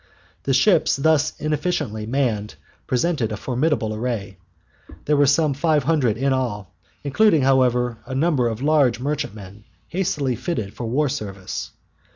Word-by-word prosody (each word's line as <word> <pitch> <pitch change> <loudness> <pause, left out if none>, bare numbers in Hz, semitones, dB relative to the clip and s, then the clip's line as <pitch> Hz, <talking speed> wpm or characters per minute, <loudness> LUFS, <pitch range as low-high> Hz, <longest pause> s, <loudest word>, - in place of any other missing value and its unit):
The 135 - +1
ships 170 +4 +4
thus 155 +2 +1
inefficiently 150 - -2
manned 115 -5 -1 0.3
presented 130 -3 0
a 105 - -3
formidable 125 -3 -1
array. 110 -5 -4 0.7
There 150 - +2
were 145 -1 +4
some 145 +1 +3
five 150 0 +1
hundred 135 -7 +1
in 135 +2 +1
all, 105 -7 -3 0.3
including, 160 +1 +3
however, 125 -3 +2
a 130 - -5
number 140 -4 +2
of 115 +2 -4
large 140 -6 +3
merchantmen 110 -8 -5 0.3
hastily 150 -8 -1
fitted 110 - -4
for 120 - -5
war 145 +6 +1
service. 100 -8 -5
130 Hz, 140 wpm, -22 LUFS, 110-150 Hz, 0.7 s, ships